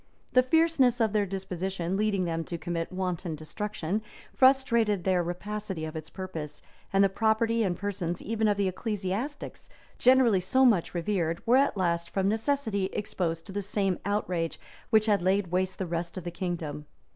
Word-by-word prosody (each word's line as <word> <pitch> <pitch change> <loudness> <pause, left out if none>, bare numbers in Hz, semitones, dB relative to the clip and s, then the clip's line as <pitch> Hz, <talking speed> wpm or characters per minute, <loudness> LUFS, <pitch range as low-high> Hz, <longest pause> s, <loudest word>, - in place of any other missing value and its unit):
The 255 - +7
fierceness 265 -3 +3
of 220 -2 +2
their 205 -2 +2
disposition, 190 -1 -3
leading 200 -2 +1
them 165 -1 -2
to 175 - -4
commit 165 0 -3
wanton 180 -3 -3
destruction, 195 +4 -3 0.3
frustrated 235 -7 +3
their 185 -2 +2
rapacity 190 0 -4
of 155 0 -7
its 155 -1 -6
purpose; 160 -6 -7 0.3
and 195 0 +4
the - - +6
property 225 +3 +1
and 185 -5 0
persons 185 -4 -3
even 220 +1 0
of 205 -1 +2
the 200 -1 +1
ecclesiastics, 210 - -4 0.3
generally 250 -5 +5
so 260 +8 +3
much 200 -8 +3
revered, 170 -2 -1
were 245 +3 +5
at 275 -5 +2
last, 170 -2 0
from 195 -1 0
necessity, 220 -2 0
exposed 165 -5 -2
to - - -8
the 205 +1 -2
same 195 -2 -1
outrage 180 -5 -1 0.3
which 220 -2 +4
had 205 -3 +3
laid 190 0 +1
waste 185 +1 0
the 190 - -2
rest 170 +1 -4
of 185 - -5
the 175 - -4
kingdom. 165 -5 -4
195 Hz, 170 wpm, -28 LUFS, 175-220 Hz, 0.3 s, The